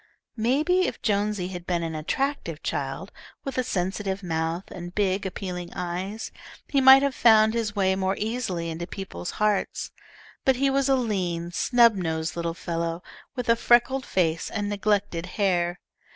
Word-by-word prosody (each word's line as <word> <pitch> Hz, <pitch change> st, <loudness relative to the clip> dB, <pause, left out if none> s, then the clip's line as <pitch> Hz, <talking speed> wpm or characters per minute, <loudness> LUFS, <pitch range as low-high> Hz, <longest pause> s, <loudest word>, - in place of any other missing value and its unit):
Maybe 300 Hz, +11 st, +2 dB
if -, -, -6 dB
Jonesy 205 Hz, -3 st, 0 dB
had 175 Hz, -2 st, -7 dB
been 175 Hz, -2 st, 0 dB
an 165 Hz, -1 st, -3 dB
attractive 165 Hz, -, -2 dB
child, 140 Hz, +7 st, -3 dB, 0.3 s
with 270 Hz, -2 st, -3 dB
a -, -, +2 dB
sensitive 195 Hz, 0 st, -2 dB
mouth, 165 Hz, +1 st, -1 dB
and 175 Hz, 0 st, -8 dB
big, 195 Hz, -1 st, +1 dB
appealing 180 Hz, -2 st, -5 dB
eyes, 185 Hz, +5 st, -4 dB, 0.4 s
he 275 Hz, -, +2 dB
might 265 Hz, +1 st, +9 dB
have 280 Hz, -1 st, +1 dB
found 220 Hz, -3 st, +5 dB
his 225 Hz, -3 st, -2 dB
way 190 Hz, -1 st, +2 dB
more 190 Hz, 0 st, 0 dB
easily 210 Hz, -7 st, -2 dB
into 170 Hz, +2 st, -5 dB
people's 185 Hz, -, -6 dB
hearts. 210 Hz, -1 st, 0 dB, 0.5 s
But 265 Hz, -, +4 dB
he 275 Hz, +2 st, +2 dB
was 275 Hz, 0 st, +1 dB
a 270 Hz, -, +5 dB
lean, 180 Hz, -8 st, -1 dB
snub 235 Hz, +5 st, +4 dB
nosed 160 Hz, -4 st, -2 dB
little 170 Hz, -1 st, -2 dB
fellow, 170 Hz, 0 st, -3 dB, 0.3 s
with 250 Hz, -1 st, -4 dB
a 230 Hz, -, +5 dB
freckled 240 Hz, +3 st, +3 dB
face 165 Hz, -3 st, 0 dB
and 205 Hz, -2 st, -2 dB
neglected 205 Hz, -4 st, 0 dB
hair. 175 Hz, -3 st, +1 dB
195 Hz, 160 wpm, -26 LUFS, 175-230 Hz, 0.5 s, might